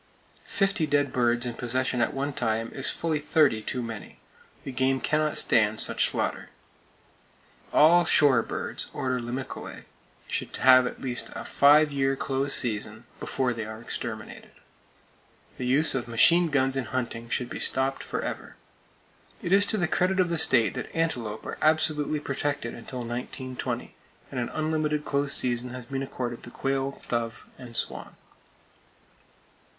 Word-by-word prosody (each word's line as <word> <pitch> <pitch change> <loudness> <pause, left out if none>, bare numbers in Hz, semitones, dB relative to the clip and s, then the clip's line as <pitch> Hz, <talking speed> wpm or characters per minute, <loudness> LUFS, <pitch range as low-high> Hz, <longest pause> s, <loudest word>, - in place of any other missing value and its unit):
Fifty 195 -5 +1
dead 145 -2 +1
birds 120 0 +2
in 120 - -3
possession 125 +1 -1
at - - +2
one 140 +1 -3
time 115 -2 -1
is 135 - -2
fully 160 -2 -1
thirty 145 -6 +3
too 125 +3 -3
many. 110 -2 -8 0.5
The - - -5
game 130 +1 +1
cannot 150 +2 0
stand 110 0 +3
such - - +2
slaughter! - - -3 1.2
All 170 +3 +6
shore 145 -7 +5
birds - - -4
(Order 130 -1 -1
Limicolae) 125 +2 -6 0.4
should - - -3
have 130 -1 +6
at - - -7
least 125 -2 -2
a - - -6
five 150 +2 +5
year 135 -1 +1
close 135 +1 -1
season, 110 -1 -2
before 130 -2 -1
they 115 -1 -4
are 110 0 -7
exterminated. 115 -1 -6 1.1
The 125 - -3
use 145 +5 +5
of 125 -2 -2
machine 170 +9 +5
guns 135 -2 +1
in 135 -2 -1
hunting 115 0 -4
should 125 0 -2
be - - -5
stopped, 135 +1 0
forever. - - -5 0.9
It 170 - -3
is 200 +1 +6
to 215 - +4
the 175 -4 +1
credit 185 +3 +1
of 180 -1 +3
the 170 -1 0
state 115 -9 +4
that - - -5
antelope 120 -10 -2
are - - -6
absolutely 155 -1 +2
protected 140 -3 -3
until 125 +2 -7
1920, 125 +2 -5 0.4
and 130 - -3
an 120 - -2
unlimited 155 -1 -1
close 140 0 0
season 125 0 0
has 125 -2 -8
been 135 +2 -4
accorded 125 -3 -4
the - - -9
quail, 135 +2 -2
dove 115 -1 -3
and 120 -2 -6
swan. - - -4
130 Hz, 155 wpm, -27 LUFS, 120-150 Hz, 1.2 s, All